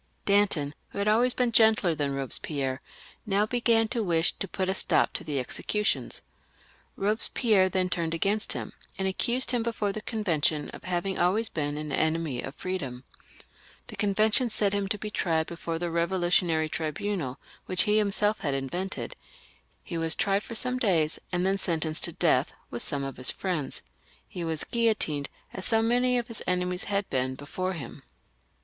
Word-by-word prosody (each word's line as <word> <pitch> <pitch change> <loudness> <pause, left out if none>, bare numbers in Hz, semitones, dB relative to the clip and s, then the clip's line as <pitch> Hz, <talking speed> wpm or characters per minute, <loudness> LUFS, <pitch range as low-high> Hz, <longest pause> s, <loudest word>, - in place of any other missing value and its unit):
Danton, 200 -8 +2 0.2
who - - -10
had 200 +1 0
always 240 +4 +3
been 245 -2 +1
gentler 220 -6 +5
than 145 -3 -2
Eobespierre, 135 0 -1 0.4
now 205 0 +2
began 230 -1 +2
to 235 - -1
wish 170 -4 +2
to 195 - -3
put 185 +1 -2
a 190 - +2
stop - - +2
to - - -3
the 150 -3 -3
executions. 210 - -1 0.7
Eobespierre 210 -1 +2
then 185 0 +1
turned 170 -2 -1
against 205 +5 +1
him, - - -5 0.2
and 190 - 0
accused 240 +7 +1
him 245 -2 +1
before 225 -3 -1
the 215 - -5
Convention 165 -10 0
of - - -11
having 185 +1 -1
always 200 +6 +2
been 145 -2 -2
an 150 -1 -5
enemy 160 -5 0
of 140 - -7
freedom. 140 -10 -4 0.8
The - - -9
Convention 215 +4 +2
sent 205 -2 +2
him 200 -1 0
to 210 - -1
be 210 +1 -6
tried 160 -5 +1
before 165 0 -4
the 175 - -3
Eevolutionary 170 -1 +1
Tribunal, 155 -3 -2 0.3
which 185 - +3
he 210 +1 +3
himself 210 +1 +2
had 140 -4 -1
invented; 175 +9 -4 0.7
he 170 -2 -4
was 165 0 +4
tried 200 -1 +2
for 230 - -8
some 250 +2 +1
days, 165 -9 +2
and 180 0 0
then 195 +1 +1
sentenced 160 -3 +3
to - - -2
death - - +2 0.2
with 120 - -3
some 140 -1 0
of 135 -1 -5
his 130 - +1
friends. 170 -8 -3 0.4
He 175 - -6
was 160 -2 0
guillotined, 215 -12 +1 0.2
as 190 - -3
so 225 -1 +3
many 245 +2 +3
of 240 -1 -2
his 230 -3 -7
enemies 180 0 0
had 200 -1 -1
been 130 0 0
before 185 +7 -3
him. 140 -9 -8
185 Hz, 175 wpm, -28 LUFS, 160-210 Hz, 0.8 s, gentler